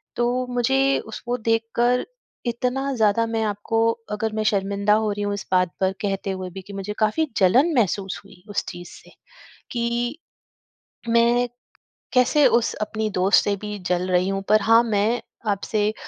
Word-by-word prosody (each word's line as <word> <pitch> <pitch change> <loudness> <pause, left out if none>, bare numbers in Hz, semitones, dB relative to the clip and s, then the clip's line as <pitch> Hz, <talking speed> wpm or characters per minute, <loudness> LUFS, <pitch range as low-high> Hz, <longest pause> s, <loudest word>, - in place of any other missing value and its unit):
तो 245 +1 0
मुझे 270 +3 +2
उसको 240 +3 -4
देखकर 230 +2 +1 0.4
इतना 255 +3 -1
ज़्यादा 220 0 +3
मैं 225 0 -1
आपको 210 +2 -1 0.3
अगर 215 +1 -1
मैं 215 - 0
शर्मिंदा 200 +1 +1
हो 215 0 +1
रही 205 0 -4
हूँ 205 0 -1
इस 200 - -5
बात 180 -1 +3
पर 190 0 +2
कहते 195 -1 -2
हुए 185 -1 -5
भी 190 +2 -8
कि 200 - -9
मुझे 195 +1 -4
काफ़ी 220 +9 +1
जलन 250 - +4
महसूस 195 -4 0
हुई 190 -3 -17
उस 205 - -1
चीज़ 175 0 -9
से। - - -15 0.6
कि 240 +3 -1 0.9
मैं 235 +1 +3 0.7
कैसे 255 +4 +4
उस 235 -1 +2
अपनी 215 0 -2
दोस्त 190 +2 +4
से 205 - +1
भी 210 -1 -5
जल 180 0 0
रही 180 +1 +3
हूँ। 195 0 -1
पर 215 0 +5
हाँ, 225 +2 +6
मैं 220 +1 +1 0.3
आपसे 210 +1 -1
215 Hz, 165 wpm, -23 LUFS, 200-240 Hz, 0.9 s, हाँ